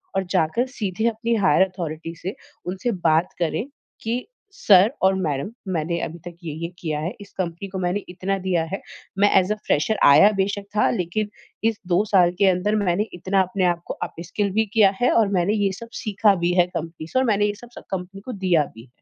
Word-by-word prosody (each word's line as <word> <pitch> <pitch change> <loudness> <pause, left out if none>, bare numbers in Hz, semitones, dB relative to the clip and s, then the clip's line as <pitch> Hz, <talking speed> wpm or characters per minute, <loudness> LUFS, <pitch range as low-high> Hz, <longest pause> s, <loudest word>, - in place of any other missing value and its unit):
और 195 - +1
जाकर 180 +6 +2
सीधे 220 -4 -3
अपनी 230 +1 -1
हायर 195 -3 +3
अथॉरिटी 165 -3 -6
से 190 - -3 0.3
उनसे 190 +6 -2
बात 160 +2 +3
करे 170 +4 0 0.4
कि 230 +2 -1 0.4
सर 200 - +5
और 190 0 +5
मैडम 145 +5 -2 0.2
मैंने 170 +1 -1
अभी 170 +2 -10
तक 175 -1 -8
ये-ये 165 +1 -5
किया 155 -3 -2
है। 170 +5 -3
इस 200 - -12
कंपनी 175 +2 -3
को 190 0 -5
मैंने 185 +3 -1
इतना 190 +2 -2
दिया 175 -3 +2
है। 195 - -3 0.4
मैं 205 +1 +5
ऐज़ 185 +3 -1
अ - - -5
फ्रेशर 155 +9 +1
आया 155 +9 +8
बेशक 200 +1 -2
था, - - +4
लेकिन 195 +4 -2 0.4
इस 220 - -6
2 180 +3 +3
साल 185 -4 +4
के 200 - +5
अंदर 190 +4 +1
मैंने 195 +3 +1
इतना 190 +2 +1
अपने 185 0 0
आप 175 -1 +1
को - - -3 0.2
अपस्किल 200 +4 -3
भी 220 - +3
किया 210 -4 +6
है 245 - +4
और 225 -2 +4
मैंने 180 +4 +1
ये 200 -2 +1
सब 230 - -10
सीखा 205 -1 +3
भी 175 - +2
है 175 - +5
कंपनी 165 -2 -6
से 255 - 0
और 260 - +2
मैंने 205 -3 +2
ये 205 - 0
सब 240 - -12
सब - - -10
कंपनी 190 +1 -5
को 255 - -5
दिया 170 -4 +4
भी। 115 +3 -13
185 Hz, 210 wpm, -23 LUFS, 170-205 Hz, 0.4 s, आया